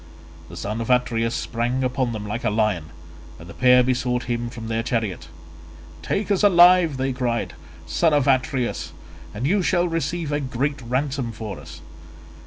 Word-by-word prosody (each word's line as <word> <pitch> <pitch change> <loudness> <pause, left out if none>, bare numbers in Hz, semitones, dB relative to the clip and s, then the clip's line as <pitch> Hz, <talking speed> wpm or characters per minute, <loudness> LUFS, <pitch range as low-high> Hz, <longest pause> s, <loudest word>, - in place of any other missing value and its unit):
The - - -10
son 105 +3 -3
of 115 - -5
Atreus 115 -2 +1
sprang 120 +3 -2
upon 130 -1 0
them 110 -2 -5
like 105 +3 -4
a - - +2
lion, 105 -6 0 0.5
and 80 - -12
the - - -10
pair 125 0 +5
besought 125 -1 0
him 120 -1 -3
from 115 -1 -8
their 115 0 -1
chariot. 115 -5 -2 0.7
"Take 200 - -2
us 195 - +2
alive," 175 -5 +6
they 130 0 -1
cried, 120 -2 -2 0.3
"son 165 - +2
of 145 -3 +2
Atreus, 130 -2 0 0.4
and 115 +5 -4
you 195 +7 +2
shall 175 0 +1
receive 165 -1 -2
a 145 - 0
great 135 +1 -2
ransom 130 0 -2
for 110 -3 -7
us. - - -12
125 Hz, 170 wpm, -23 LUFS, 115-145 Hz, 0.7 s, alive